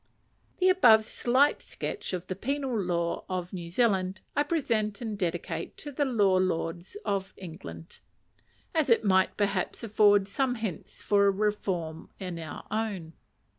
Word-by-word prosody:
The 370 Hz, -, +3 dB
above 225 Hz, -, +6 dB
slight 260 Hz, +6 st, +2 dB
sketch -, -, -5 dB
of 180 Hz, -1 st, -3 dB
the 185 Hz, -, -4 dB
penal 270 Hz, +4 st, -2 dB
law 175 Hz, -4 st, -1 dB
of 180 Hz, -1 st, -3 dB
New 170 Hz, -2 st, -5 dB
Zealand 190 Hz, -2 st, +1 dB
I -, -, +3 dB
present 230 Hz, -10 st, 0 dB
and 220 Hz, -3 st, -4 dB
dedicate 180 Hz, -4 st, -3 dB
to 290 Hz, -, -6 dB
the 285 Hz, +1 st, 0 dB
Law 205 Hz, -7 st, +3 dB
Lords 175 Hz, -, -2 dB
of 195 Hz, -1 st, -2 dB
England; 170 Hz, -2 st, -10 dB, 0.7 s
as 315 Hz, -5 st, +2 dB
it 230 Hz, -1 st, +4 dB
might, 190 Hz, -1 st, +3 dB
perhaps, 200 Hz, +1 st, -1 dB
afford 205 Hz, -2 st, +4 dB
some 250 Hz, +4 st, 0 dB
hints 215 Hz, -8 st, -6 dB
for 200 Hz, -1 st, +4 dB
a -, -, +5 dB
reform 190 Hz, -6 st, -2 dB
in 180 Hz, -3 st, -5 dB
our 160 Hz, -2 st, -7 dB
own. 205 Hz, -7 st, -3 dB
200 Hz, 150 wpm, -28 LUFS, 185-230 Hz, 0.7 s, above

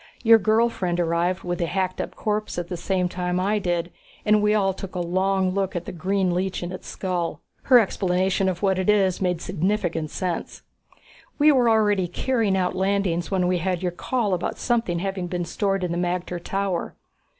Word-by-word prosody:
Your 225 Hz, -1 st, +7 dB
girl 220 Hz, +3 st, +3 dB
friend 180 Hz, -6 st, -2 dB
arrived 175 Hz, +2 st, 0 dB
with 175 Hz, -1 st, -3 dB
the 170 Hz, -, 0 dB
hacked 185 Hz, +1 st, -1 dB
up -, -, -6 dB
corpse 210 Hz, -2 st, -2 dB
at 175 Hz, -1 st, -3 dB
the 180 Hz, -, -3 dB
same 180 Hz, +1 st, 0 dB
time 180 Hz, 0 st, -2 dB
I 205 Hz, +3 st, +1 dB
did, 175 Hz, -2 st, -1 dB, 0.3 s
and 210 Hz, 0 st, +4 dB
we 210 Hz, 0 st, +3 dB
all 195 Hz, -2 st, +2 dB
took 190 Hz, 0 st, -8 dB
a -, -, -1 dB
long 185 Hz, +2 st, +1 dB
look 195 Hz, 0 st, -1 dB
at 175 Hz, 0 st, -3 dB
the -, -, -5 dB
green 185 Hz, +1 st, 0 dB
leech 185 Hz, 0 st, -2 dB
in 175 Hz, -, -4 dB
its 185 Hz, -, -8 dB
skull. 180 Hz, -3 st, -3 dB, 0.2 s
Her 255 Hz, -, +7 dB
explanation 190 Hz, -3 st, +1 dB
of 180 Hz, +1 st, -4 dB
what 190 Hz, -1 st, +2 dB
it 185 Hz, -, 0 dB
is 195 Hz, -3 st, +3 dB
made 180 Hz, -2 st, 0 dB
significant 180 Hz, -3 st, -1 dB
sense. 180 Hz, +1 st, -4 dB, 0.7 s
We 300 Hz, +1 st, +6 dB
were 250 Hz, -4 st, +4 dB
already 205 Hz, -4 st, +3 dB
carrying 215 Hz, +1 st, 0 dB
out 180 Hz, -1 st, 0 dB
landings 190 Hz, -3 st, 0 dB
when 185 Hz, -2 st, +1 dB
we 180 Hz, 0 st, +1 dB
had 180 Hz, +1 st, -2 dB
your 180 Hz, -, 0 dB
call 210 Hz, +3 st, -1 dB
about 180 Hz, -, -2 dB
something 230 Hz, -8 st, 0 dB
having 190 Hz, 0 st, -3 dB
been 175 Hz, 0 st, -3 dB
stored 195 Hz, +2 st, -1 dB
in 180 Hz, -, -1 dB
the 170 Hz, -, -1 dB
magter 175 Hz, 0 st, -2 dB
tower. 195 Hz, -3 st, -2 dB
185 Hz, 200 wpm, -24 LUFS, 175-200 Hz, 0.7 s, Your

